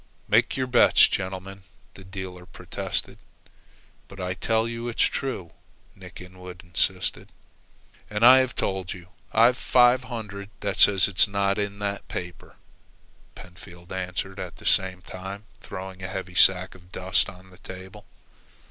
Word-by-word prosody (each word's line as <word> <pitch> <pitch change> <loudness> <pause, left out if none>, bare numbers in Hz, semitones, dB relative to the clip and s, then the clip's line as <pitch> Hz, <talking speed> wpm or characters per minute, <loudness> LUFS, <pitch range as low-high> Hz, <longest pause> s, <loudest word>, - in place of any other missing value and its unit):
"Make - - +3
your 130 - 0
bets, 125 -1 +6
gentlemen," 95 +1 -4 0.3
the 95 - -13
dealer 95 -1 -8
protested. - - -4 0.9
"But 100 - -13
I 90 0 -2
tell 110 +5 0
you 115 0 -5
it's 120 - 0
true," 125 -11 -2 0.4
Nick - - -12
Inwood 90 0 -11
insisted. 90 -2 -1 0.8
"And 105 +2 +2
I 130 +2 +9
have 130 -1 0
told 95 -2 -2
you 90 -1 -13 0.2
I've 120 +3 +4
five 125 0 +4
hundred 105 -4 -7
that 100 -2 -3
says 95 -2 +6
it's 95 0 +5
not 100 0 0
in 100 0 -3
that 100 0 -4
paper," 90 0 -7 0.8
Pentfield 85 0 -14
answered, 95 +1 -4
at 90 -2 -6
the - - -15
same 95 -1 +2
time 95 +3 -8 0.2
throwing 95 0 -8
a 95 - -4
heavy 95 -1 -6
sack 90 +1 +4
of 90 -1 -18
dust 95 +1 0
on 95 +1 -15
the 90 - -18
table. 95 +3 -11
95 Hz, 150 wpm, -25 LUFS, 90-105 Hz, 0.9 s, I